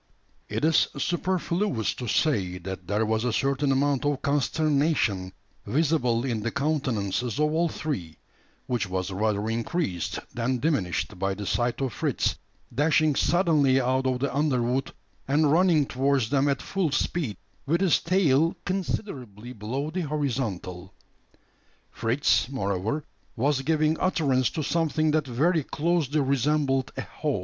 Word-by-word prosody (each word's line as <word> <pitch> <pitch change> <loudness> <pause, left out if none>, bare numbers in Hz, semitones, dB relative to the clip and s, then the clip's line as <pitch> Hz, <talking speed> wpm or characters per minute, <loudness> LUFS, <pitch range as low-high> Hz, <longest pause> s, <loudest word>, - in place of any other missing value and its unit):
It - - -1
is 160 0 +4
superfluous 175 - 0
to 125 - -6
say, 100 - +1
that 90 0 -7
there 105 +3 +1
was 110 +1 0
a 125 - +1
certain 135 +4 +1
amount 140 0 +1
of 145 -2 -1
consternation 140 - +1 0.4
visible 135 -5 +1
in 120 -4 -1
the 120 - -1
countenances 120 -6 -1
of 150 0 +2
all 170 +1 +2
three; 125 - -4 0.5
which 120 -6 -1
was 95 +1 -2
rather 105 +1 0
increased 115 - -2 0.2
than 125 +2 0
diminished 95 - -1
by 95 0 0
the 105 +1 -6
sight 120 +5 0
of 130 -5 -1
Fritz - - 0 0.4
dashing 155 +3 +3
suddenly 150 -7 +3
out 130 +1 +1
of 130 -1 +1
the 135 +2 -2
underwood, 130 -3 +1 0.4
and 145 +1 +3
running 165 -3 +4
towards 135 -2 0
them 140 0 +3
at 140 - -1
full 190 -5 0
speed, 145 - -1 0.3
with 170 +5 +2
his 190 -4 +4
tail 165 -3 +3
considerably 130 - -4
below 130 +7 -4
the 185 +2 -2
horizontal. 115 - -3 1.0
Fritz, 115 -2 +1
moreover, 110 +3 -2 0.3
was 135 +2 +1
giving 155 +2 +1
utterance 140 -9 +2
to 155 - -3
something 155 0 +1
that 155 -2 +1
very 155 +6 +1
closely 155 -1 0
resembled 135 0 +1
a - - -1
howl. 150 -8 -3
135 Hz, 140 wpm, -26 LUFS, 115-155 Hz, 1.0 s, is